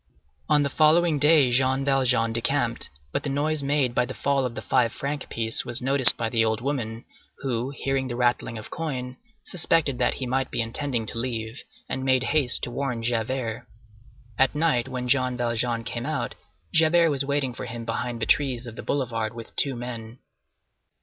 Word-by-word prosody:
On 150 - +4
the 140 - 0
following 155 +1 +4
day 150 -3 +5
Jean 130 +2 +2
Valjean 125 -4 +2
decamped; 120 0 -1 0.2
but - - -1
the 145 - -4
noise 150 +2 0
made 140 -3 +1
by 125 - +2
the 130 +1 -6
fall 140 -2 +1
of 120 -2 -4
the - - -5
five 115 -2 +2
franc 140 0 -4
piece 115 -1 +1
was 120 +1 +3
noticed 130 0 +5
by 115 - -1
the 115 0 +2
old 110 -1 0
woman, 120 -4 -3 0.4
who, 125 -1 -1
hearing 135 -1 -2
the 120 - -4
rattling 120 -2 0
of 110 - -9
coin, 130 -6 -4 0.3
suspected 160 -6 +1
that 125 - +2
he 130 - -4
might 130 +1 -1
be - - -4
intending 115 +1 -2
to 115 - -1
leave, 115 -1 -4 0.3
and 130 - -3
made 130 -1 +2
haste 140 -3 +3
to 120 - -3
warn 125 -2 -3
Javert. 115 0 -2 0.7
At 135 +2 +3
night, 150 -6 +1
when 125 -1 -4
Jean 130 -1 +1
Valjean 120 -1 -1
came - - -4
out, - - -2 0.4
Javert 165 0 +4
was 140 -1 -1
waiting 140 -2 -1
for - - -6
him 115 0 -6
behind 120 0 -3
the 110 - 0
trees 130 -4 +1
of 115 -2 -8
the - - -7
boulevard 115 -5 -2
with 115 -1 -10
two 140 -2 0
men. 120 -1 -7
125 Hz, 190 wpm, -25 LUFS, 115-140 Hz, 0.7 s, day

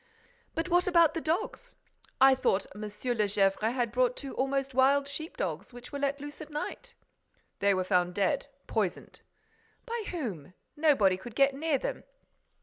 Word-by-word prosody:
"But 325 +2 -1
what 355 0 +3
about 335 -3 +5
the 330 - -3
dogs? 440 +10 -2 0.4
I 265 0 +8
thought 205 -7 +1
M. 210 - -9
de 215 - -3 0.4
Gesvres 195 -1 +2
had 235 +1 0
bought 250 0 +1
two 275 - -6
almost 270 0 -1
wild 275 +2 +4
sheep 315 +3 -6
dogs, 170 +6 -3
which 245 +2 -10
were 285 - -4
let 280 0 0
loose 290 +2 -8
at 305 - -8
night?" 475 +11 -6 0.6
"They 200 -1 +3
were 185 - 0
found 180 -1 +1
dead, 235 +9 +1 0.2
poisoned." 210 -6 -3 0.6
"By 465 -2 -4
whom? 195 - -5 0.2
Nobody 270 -12 +4
could 220 +4 -10
get 275 0 +4
near 295 +1 0
them." - - -4
270 Hz, 165 wpm, -30 LUFS, 210-310 Hz, 0.6 s, I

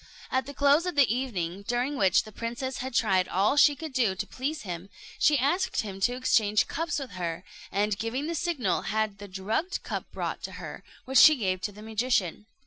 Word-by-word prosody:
At 260 0 0
the 285 - -7
close 285 +5 +4
of 360 - -2
the 265 -5 +4
evening, 195 -8 -3
during 245 +4 0
which 190 -8 +3
the 215 - -12
princess 240 +4 -4
had 260 -1 -5
tried 190 -6 +3
all 200 +8 +2
she 290 0 +6
could 315 0 -7
to 235 -8 +2
please 290 +4 -4
him, 180 -1 -6 0.3
she 295 -1 +4
asked 345 +9 +1
him 195 -3 -7
to 245 +6 +1
exchange 215 -4 +2
cups 335 +2 -2
with 270 -5 -5
her, 175 -1 -4 0.3
and 205 0 0
giving 235 +6 -2
the 335 - -2
signal, 290 - 0
had 215 -1 -1
the 205 - -8
drugged 205 - -2
cup - - -5
brought - - -4
to - - -6
her, - - -8 0.2
which 265 0 +4
she 310 - +9
gave 185 -7 -1
to 205 - -3
the 210 +1 -12
magician. 220 -3 -1
230 Hz, 205 wpm, -28 LUFS, 200-280 Hz, 0.3 s, she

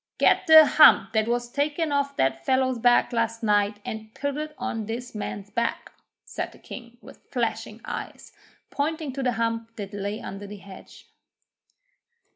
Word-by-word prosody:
'Get - - +3
the 315 -1 +10
hump 305 -4 +6
that 220 0 +1
was 240 0 -1
taken 295 +3 -1
off 280 0 -1
that 135 0 0
fellow's 260 - +1
back 240 +1 +3
last 230 0 -1
night 205 -1 +2
and 220 0 -7
put 285 -1 -3
it 305 0 -5
on 240 -4 -4
this 240 +2 -5
man's 205 -1 -6
back,' 235 +2 -2 0.3
said - - -5
the - - -17
King, 240 -1 -11
with - - -14
flashing - - -3
eyes, - - -7 0.4
pointing 305 -1 -2
to 270 - -4
the 250 -2 +1
hump 230 0 -2
that 200 -1 -7
lay 205 +1 -4
under 200 +1 -8
the 205 +1 -9
hedge. 195 -1 -14
235 Hz, 165 wpm, -25 LUFS, 210-280 Hz, 0.4 s, the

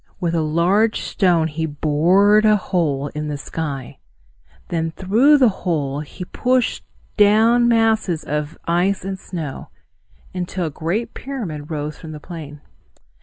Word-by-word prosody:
With 170 -2 -1
a 165 - +1
large 175 +8 +2
stone 175 -5 +2
he 160 +1 -3
bored 175 +8 +3
a 215 -1 +5
hole 150 -8 -1
in 150 +1 -5
the 150 -1 -3
sky. 140 -3 -5 0.7
Then 165 -1 -1
through 225 - +4
the 255 -4 +5
hole 145 -6 -1
he 155 +4 -8
pushed 250 +5 0 0.3
down 225 +3 +5
masses 220 -7 +2
of 150 +1 -3
ice 180 +3 +1
and 190 0 -4
snow, 160 -8 -6 0.6
until 180 0 -3
a 155 - -3
great 170 +10 -3
pyramid 180 - -6
rose 150 -1 -4
from 155 -1 -9
the 150 - -8
plain. 150 -3 -9
170 Hz, 140 wpm, -20 LUFS, 150-210 Hz, 0.7 s, a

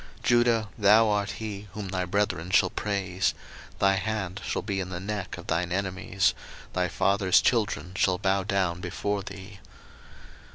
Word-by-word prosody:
01:049:008 - - -22
Judah, 120 -3 +3
thou 105 +2 +6
art 100 -1 0
he 105 -2 -6
whom 105 -2 -5
thy 90 -1 -1
brethren 90 -2 -1
shall 95 -1 +4
praise: 95 -3 -1 0.4
thy 95 0 +4
hand 95 -1 -3
shall - - -2
be 100 -2 -2
in 90 -1 -3
the 90 -1 -4
neck 100 0 -4
of - - -10
thine 85 +1 -1
enemies; 95 0 0 0.4
thy 90 -1 +1
father's 100 +1 +3
children 105 -6 0
shall 90 0 +2
bow 95 0 +1
down 95 -3 0
before 100 +1 -2
thee. 95 0 -10
100 Hz, 160 wpm, -27 LUFS, 95-105 Hz, 0.4 s, thou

